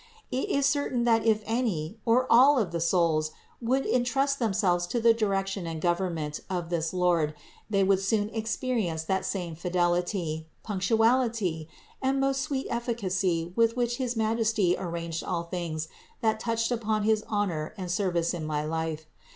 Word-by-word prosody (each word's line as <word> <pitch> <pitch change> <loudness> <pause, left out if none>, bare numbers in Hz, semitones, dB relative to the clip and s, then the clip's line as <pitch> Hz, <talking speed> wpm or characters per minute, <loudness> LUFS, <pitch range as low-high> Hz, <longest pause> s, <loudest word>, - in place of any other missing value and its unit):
It 260 - -1
is 280 -1 +2
certain 280 -4 +1
that 230 -1 +3
if 215 -1 +3
any 220 -5 -1
or 245 +3 +4
all 270 +5 +6
of 205 -8 0
the 170 - -2
souls 165 -3 +2 0.3
would 260 +3 +1
entrust 270 +3 +1
themselves 190 -6 +1
to 240 - -1
the 230 0 +5
direction 195 -4 -1
and 165 -1 -4
government 170 -3 -1
of 175 -2 -3
this 165 -1 0
Lord 175 -4 +1 0.3
they 195 -2 +2
would 190 0 +3
soon 205 +2 0
experience 220 -6 -2
that 190 +3 -1
same 175 -4 -3
fidelity, 175 -1 -1 0.2
punctuality 220 -4 +1 0.3
and 270 +1 +1
most 270 0 +1
sweet 270 -2 -2
efficacy 185 -8 -1
with 230 +1 +3
which 240 -1 0
his 250 -2 -2
Majesty 220 -4 +2
arranged 170 -2 -4
all 170 -2 -2
things 170 -3 -4 0.3
that 220 -2 +1
touched 230 +1 -1
upon 220 -3 0
his 215 0 +2
honor 185 -7 -2
and 180 -2 -4
service 175 -2 0
in 170 -3 -4
my 150 -1 -2
life. 160 0 -3
195 Hz, 160 wpm, -28 LUFS, 170-230 Hz, 0.3 s, all